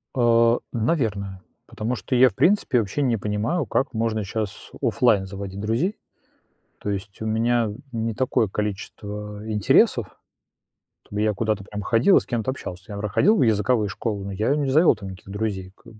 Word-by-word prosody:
А, 115 -1 +4 0.2
наверное. 110 - -1 0.3
Потому 115 +4 -3
что 125 +3 -3
я 125 +1 +7
в - - -18
принципе 185 -9 +3
вообще 110 +6 -2
не 125 -5 +2
понимаю, 110 - -1
как 130 +5 -1
можно 110 -1 -1
щас 105 0 -5
офлайн 110 -6 +3
заводить 100 0 -7
друзей. 125 - 0 0.8
То 105 - -4
есть 100 +1 -5
у - - -3
меня 115 +1 +1 0.2
не 115 -1 -1
такое 120 -3 +1
количество 105 +1 -5
интересов, 105 -2 +3 1.0
чтобы 105 +1 -1
я 110 -1 +2
куда-то 105 -1 -1
прям 105 +1 -6
ходил 115 - +4
и - - +6
с - - -10
кем-то 120 0 -1
общался. 90 -8 -8
Я 100 - -6
вр 105 +1 -2
ходил 210 - +4
в - - +2
языковые 110 -1 +2
школы, 100 0 -3
но 100 - -5
я 110 +8 +1
не 145 -2 0
завел 155 +6 +5
там 100 -2 -8
никаких 95 +1 -11
друзей 100 -3 -3
как 115 - -17
бы. 110 - -18
110 Hz, 180 wpm, -24 LUFS, 100-120 Hz, 1.0 s, я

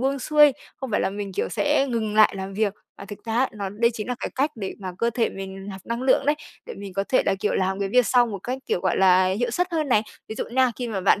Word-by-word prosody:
buông 270 +2 0
xuôi, 295 +1 +5 0.2
không 265 -2 -6
phải 205 - +1
là - - 0
mình, 200 -1 -5
kiểu, - - -1
sẽ 285 - +1
ngừng 220 -3 -1
lại 215 -1 +5
làm 190 0 -5
việc. 210 -1 0 0.2
Mà 200 - -8
thực 205 +2 -10
ra 225 - -4
á, 260 +1 +3
nó 200 -3 -4
đây 230 +4 +1
chính 215 0 -5
là 250 - -1
cái - - -3
cách 280 +4 +1
để 195 -3 -5
mà 185 -1 -5
cơ 235 0 +1
thể 230 0 +1
mình 195 0 -8
nạp 190 -1 -7
năng 235 +2 -3
lượng 265 +1 +3
đấy, 295 - +4 0.3
để - - -7
mình 200 -1 -8
có 195 +1 0
thể 255 - +3
là, - - +3
kiểu, 210 - 0
làm 190 +1 0
cái 195 - 0
việc 250 +3 +4
sau 245 -1 +4
một 210 -4 -5
cách, 255 +2 -3
kiểu, 175 - 0
gọi 185 - 0
là, 185 -1 +5
hiệu 215 +6 0
suất 355 +9 0
hơn 310 -3 0
này. 215 -4 +4 0.3
Ví 220 - -5
dụ - - -3
nha, 255 +1 +2
khi 245 -1 -4
mà 205 -4 -2
bạn, 195 +1 +3
215 Hz, 300 wpm, -24 LUFS, 195-250 Hz, 0.3 s, xuôi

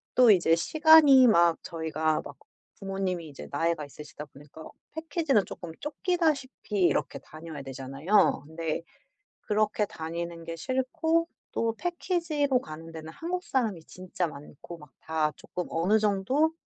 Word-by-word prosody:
또 245 -3 +7
이제 170 -3 +4
시간이 300 - +7
막 170 -5 +5
저희가 160 -1 -1
막 145 - -9 0.4
부모님이 190 -4 -3
이제 140 - -10
나이가 165 +1 0
있으시다 150 +1 -10
보니까 145 +3 -13 0.3
패키지는 305 - +1
쪼끔 170 -2 -8
쫓기다시피 295 - -1
이렇게 - - +1
다녀야 155 -2 -9
되잖아요. 135 +9 +1
근데 160 0 -3 0.7
그렇게 210 0 +1
다니는 170 -1 -6
게 165 0 -6
싫고 275 - 0 0.2
또 230 -1 0
패키지로 335 -7 0
가는 160 +1 -9
데는 160 0 -8
한국 360 +2 -4
사람이 215 -11 -1
진짜 185 -1 -4
많고 150 +2 -10
막 150 - -14
다 155 -1 0
쪼끔 180 - -6
어느 185 +7 +2
정도 215 +10 +1
180 Hz, 305 characters per minute, -28 LUFS, 160-260 Hz, 0.7 s, 또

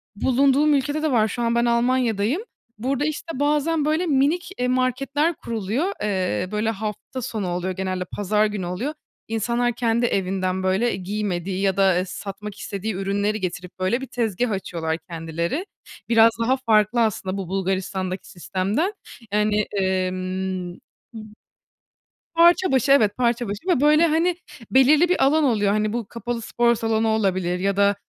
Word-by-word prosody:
Bulunduğum 275 +6 +3
ülkede 290 +2 0
de 310 - +1
var. 220 -3 +3
Şu 240 +3 -4
an 235 0 +1
ben 235 0 +2
Almanya'dayım. 235 - +1 0.4
Burada, 265 +5 -1
işte, 310 -1 -4
bazen 300 +1 +1
böyle 310 +4 +1
minik, 310 +5 +1
iii, 250 - +1
marketler 275 +5 0
kuruluyor. 235 - -2
Eee, 185 - -1
böyle 215 +1 0
hafta 220 +4 -5
sonu 215 -5 -3
oluyor, 180 +1 -2
genelde 185 0 -3
pazar 210 +3 0
günü 205 -3 -3
oluyor. 185 +12 -3 0.3
İnsanlar 235 +2 0
kendi 235 0 +1
evinden 190 -3 -1
böyle 190 +6 +1
i 185 - -6
giymediği 190 -2 -2
ya 195 -1 +1
da, 195 -2 +4
eee, 180 - 0
satmak 195 +2 -7
istediği 205 +1 -4
ürünleri 200 +2 -1
getirip 180 -1 -5
böyle 190 +7 0
bir 265 - -6
tezgâh 230 -1 -1
açıyorlar 165 -5 -3
kendileri. 170 - -3 0.4
Biraz 230 -1 +6
daha 260 +3 +2
farklı 225 -2 +2
aslında 195 -3 -1
bu 195 -3 -4
Bulgaristan'daki 190 0 -2
sistemden. 195 - -1 0.4
Yani, 210 0 +2 0.2
ımm, 185 -1 -2 0.4
b 225 - -7 1.2
parça 345 +2 +5
başı, 265 +1 +2
evet, 215 -7 +4
parça 240 -1 +1
başı 200 - -6
ve 345 -8 +2
böyle, 305 +3 +5
hani, 330 +3 +2 0.4
belirli 290 +6 +5
bir 360 - +2
alan 305 +3 +3
oluyor. 210 -7 +2
Hani 215 +1 0
bu 235 -1 -2
kapalı 235 +1 -4
spor 235 +1 +2
salonu 225 0 0
olabilir 190 -5 0
ya 195 +1 0
da 200 0 +4
220 Hz, 155 wpm, -23 LUFS, 190-260 Hz, 1.2 s, Biraz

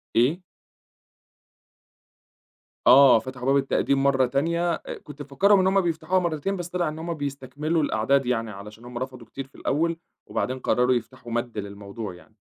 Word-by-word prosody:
إيه؟ 130 +10 +3 2.5
آه، 130 -1 +8
فتَحوا 125 +2 -8
باب 135 +1 +4
التقديم 135 0 +1
مرّة 135 -2 +3
تانية 170 +7 0
آآ، - - -6
كنت 150 0 -10
مفكّرهم 190 +9 +3
إن 185 - +3
هُم 195 0 +3
بيفتَحوها 170 +2 0
مرّتين 175 +2 -1
بس 175 -1 -5
طلِع 175 -2 -1
إن 155 +1 -7
هُم 170 +1 -3
بيستكملوا 145 +2 -2
الأعداد 135 +2 +2
يعني، 115 -3 -1
علشان 105 +4 -11
هُم 125 0 -8
رفضوا 130 -1 -6
كتير 135 +2 -7
في 135 - -28
الأول 165 +3 0 0.3
وبعدين 130 0 -2
قرّروا 125 0 +2
يفتَحوا 120 +1 -6
مدّ 120 -1 -3
للموضوع 100 0 -6
يعني، 105 +5 -19
135 Hz, 160 wpm, -25 LUFS, 120-160 Hz, 2.5 s, آه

